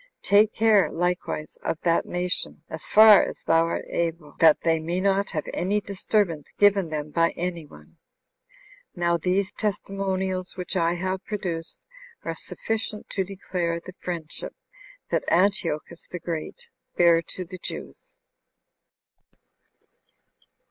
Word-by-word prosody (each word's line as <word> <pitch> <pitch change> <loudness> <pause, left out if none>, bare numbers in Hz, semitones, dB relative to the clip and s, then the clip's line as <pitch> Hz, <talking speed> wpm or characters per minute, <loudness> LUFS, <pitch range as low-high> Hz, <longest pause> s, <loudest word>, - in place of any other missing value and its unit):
Take 210 +2 +4
care 215 -3 +4
likewise 175 -3 -2
of 165 - -2
that 170 -1 +2
nation, 180 -2 -3
as 160 - -7
far 215 -1 +9
as - - -6
thou 165 0 +4
art 170 - -3
able, 165 -2 -2
that 160 -2 +6
they 165 -1 +2
may 170 +3 -2
not 195 +1 +2
have 155 -4 -3
any 200 +4 +1
disturbance 195 -5 -1
given 200 -4 +4
them 150 -1 -4
by 165 +1 +2
any 170 -3 -3
one." 75 - -17 1.0
Now 170 -1 +2
these 185 +3 0
testimonials 190 -3 -2
which 180 +1 -5
I 170 -1 +2
have 185 +2 -2
produced 175 -6 -4 0.4
are - - -2
sufficient 220 -1 -5
to 195 - 0
declare 180 -3 -3
the 185 +2 -11
friendship 170 -4 -6 0.6
that - - +1
Antiochus 170 -3 0
the 180 - -5
Great 175 - -6 0.3
bare 170 -1 +6
to 180 +2 -8
the 185 +2 -9
Jews. - - -9
180 Hz, 130 wpm, -25 LUFS, 165-195 Hz, 1.0 s, far